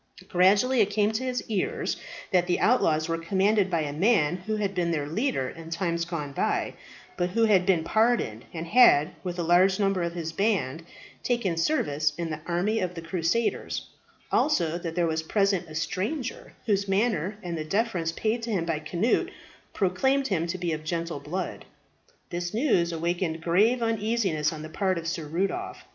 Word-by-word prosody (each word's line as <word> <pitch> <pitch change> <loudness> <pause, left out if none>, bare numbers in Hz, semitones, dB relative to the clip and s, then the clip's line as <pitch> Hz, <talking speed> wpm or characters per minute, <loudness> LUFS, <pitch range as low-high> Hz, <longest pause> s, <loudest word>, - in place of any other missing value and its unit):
Gradually 205 +8 +4
it 205 - +3
came 210 +1 +2
to 220 +4 -2
his 255 -1 -3
ears 210 -4 -1 0.4
that 180 -2 +3
the 175 - +1
outlaws 155 -10 +3
were 165 0 -1
commanded 195 +4 +2
by 170 -3 +1
a 145 -2 -3
man 180 -2 +2
who 215 +4 -3
had 205 -2 -1
been 175 -2 0
their 155 -4 -1
leader 195 - -1
in 165 -1 -10
times 170 0 -1
gone 160 -5 -4
by, - - -1 0.4
but 175 0 0
who 230 +5 +1
had 195 -4 +3
been 175 -4 +3
pardoned, 215 - +1
and 165 -1 -5
had, 170 - +6
with 180 -2 -4
a 175 - -1
large 185 +3 +4
number 195 -2 +1
of 170 0 -2
his 165 -2 -3
band, 180 -7 0 0.4
taken 235 -8 0
service 155 - +1
in 170 -1 -3
the 155 - -4
army 185 +6 0
of 180 -1 -2
the 165 - -7
crusaders; 180 +7 -1 0.4
also, 170 - +2
that 165 -2 -5
there 175 -1 +2
was 160 -1 0
present 195 0 0
a 155 - -9
stranger, 200 - -3
whose 200 -3 +1
manner 195 -2 0
and 175 -1 -3
the 155 - -3
deference 180 -1 0
paid 220 +7 -1
to 230 - -5
him 180 -5 0
by 165 -2 -1
Cnut 170 +9 0 0.4
proclaimed 265 +8 +1
him 170 -4 0
to 180 +2 -3
be 175 -2 -2
of 155 0 -5
gentle 165 -1 -3
blood. 170 +6 -4 0.7
This 175 +3 -3
news 220 - +2
awakened 170 0 -2
grave 215 +9 +3
uneasiness 215 -8 0
on 155 -1 -7
the 155 - -7
part 190 +2 0
of 165 0 -4
Sir 165 -2 -3
Rudolph. 195 - -3
180 Hz, 185 wpm, -27 LUFS, 165-210 Hz, 0.7 s, had